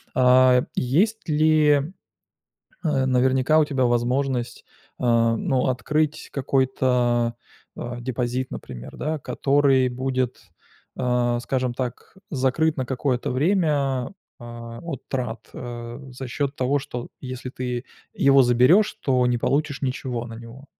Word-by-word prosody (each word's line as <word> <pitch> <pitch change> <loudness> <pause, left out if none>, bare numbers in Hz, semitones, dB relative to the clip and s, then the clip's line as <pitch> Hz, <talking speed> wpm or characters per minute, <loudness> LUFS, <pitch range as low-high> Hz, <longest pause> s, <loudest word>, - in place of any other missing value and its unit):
А 125 0 +5
есть 195 - +1
ли, 155 0 +4 1.1
э, 140 -5 +1
наверняка, 130 +4 +3
у 155 - +4
тебя 135 -4 0
возможность, 120 +1 0 0.3
э, - - -7
ну, 115 +2 +2
открыть 150 +4 -1
какой-то, 125 -3 +1 0.4
а, 120 0 -5
депозит, 125 +1 -2
например, - - -8
да, 155 0 -2
который 135 -2 +2
будет, 130 0 -2 0.6
а, 125 -1 +1
скажем 125 0 -1
так, 125 +5 -6
закрыт 150 +3 +1
на 130 - -1
какое-то 125 -1 -1
время, 145 -3 +1 0.3
а, 115 0 -8
от 165 -7 -6
трат, 120 -4 -4
э, 120 -1 -7
за 130 +1 -7
счёт 140 +2 -2
того, 135 +3 +1
что 125 -2 -7
если 130 -1 -6
ты 125 -1 -4 0.3
его 135 0 +5
заберёшь, 125 - +4
то 125 -2 +2
не 120 -1 +1
получишь 145 +3 0
ничего 125 -2 -3
на 115 - -8
него. 120 +5 -11
130 Hz, 125 wpm, -23 LUFS, 120-140 Hz, 1.1 s, А